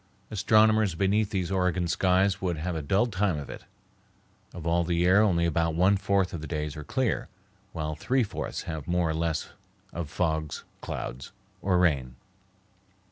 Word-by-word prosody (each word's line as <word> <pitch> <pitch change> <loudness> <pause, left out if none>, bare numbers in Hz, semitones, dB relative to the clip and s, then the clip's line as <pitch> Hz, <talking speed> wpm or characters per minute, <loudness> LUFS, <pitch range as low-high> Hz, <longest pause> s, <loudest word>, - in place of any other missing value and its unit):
Astronomers 110 -2 +4
beneath 100 +3 +2
these 95 -3 -2
Oregon 90 -2 +1
skies 95 +3 +2
would 90 -3 -1
have 85 +3 -3
a 80 - -2
dull 95 +10 +2
time 100 -6 0
of 70 -3 -6
it. - - -10 0.9
Of 85 - -9
all 85 +1 +2
the 85 0 -1
year 90 +4 +5
only 90 -6 +3
about 85 0 +1
one 95 +4 +4
fourth 100 -1 +1
of 85 - -4
the 80 - -6
days 75 -3 -3
are 75 - -6
clear, 130 - -1 0.4
while 75 -1 -3
three 125 - +1
fourths 105 - -4
have 80 -3 -6
more 85 -2 +1
or - - -1
less 80 -1 -1 0.4
of 85 -3 -4
fogs, 80 -3 -2 0.2
clouds, 65 +2 -6 0.3
or 95 -2 +2
rain. 70 -8 +1
90 Hz, 170 wpm, -27 LUFS, 80-95 Hz, 0.9 s, year